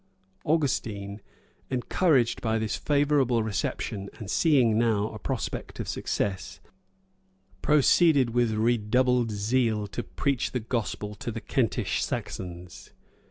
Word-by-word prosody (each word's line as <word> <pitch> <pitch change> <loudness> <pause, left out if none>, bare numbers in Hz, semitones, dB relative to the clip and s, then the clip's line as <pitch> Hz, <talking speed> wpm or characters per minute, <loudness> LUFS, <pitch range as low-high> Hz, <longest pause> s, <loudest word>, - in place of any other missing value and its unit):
[] 95 - -39
Augustine, 105 -9 -2 0.5
encouraged 130 0 +2
by 110 -1 0
this 110 -1 -1
favorable 140 -5 +2
reception, 100 -1 -3
and 105 -2 -6
seeing 130 -9 +4
now 110 -2 +2
a 110 - -9
prospect 125 -6 -4
of - - -4
success, 95 -2 -3 1.0
proceeded 150 -3 +4
with 120 -1 +1
redoubled 120 +2 +2
zeal 110 +1 0
to 110 - -5
preach 140 +1 -2
the 125 - 0
gospel 110 -2 -3
to 105 - -6
the 115 - -5
Kentish 120 -1 0
Saxons. 90 -1 -6
115 Hz, 115 wpm, -27 LUFS, 105-130 Hz, 1.0 s, seeing